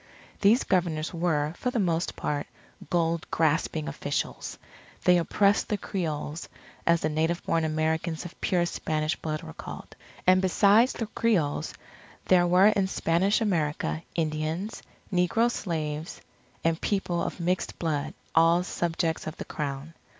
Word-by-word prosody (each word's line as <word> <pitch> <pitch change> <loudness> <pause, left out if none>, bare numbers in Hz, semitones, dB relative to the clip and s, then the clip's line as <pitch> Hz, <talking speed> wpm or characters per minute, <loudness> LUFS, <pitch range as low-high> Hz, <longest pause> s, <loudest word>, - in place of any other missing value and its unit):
These 220 +5 +5
Governors 170 -4 0
were, 160 -3 0
for 250 - -2
the 250 - -2
most 175 -4 0
part, 145 -1 -2 0.4
gold 170 -1 0
grasping 155 -1 +1
officials. 145 - -3 0.5
They 180 -1 +5
oppressed 200 +4 +2
the 210 - +1
Creoles, 160 -5 -4 0.4
as 170 0 +4
the - - +1
native 160 +3 0
born 165 -1 +1
Americans 160 +1 -1
of 175 - -10
pure 175 -2 +2
Spanish 155 -2 -1
blood 155 -1 -4
were 75 - -8
called. - - -9 0.3
And 185 0 +5
besides 205 +6 +4
the 225 - -3
Creoles, 210 -10 0 0.5
there 175 -1 +5
were 185 +4 +6
in 200 -3 +1
Spanish 190 +4 +1
America, 150 - 0
Indians, 160 +5 -2 0.3
negro 205 +7 +3
slaves, 155 -6 -3 0.4
and 165 0 +1
people 180 -4 0
of - - -3
mixed 180 +2 -1
blood, 155 -4 -2 0.2
all 165 +2 +5
subjects 165 -2 -1
of 155 - -5
the - - -6
Crown. 145 +1 -4
170 Hz, 140 wpm, -27 LUFS, 155-185 Hz, 0.5 s, were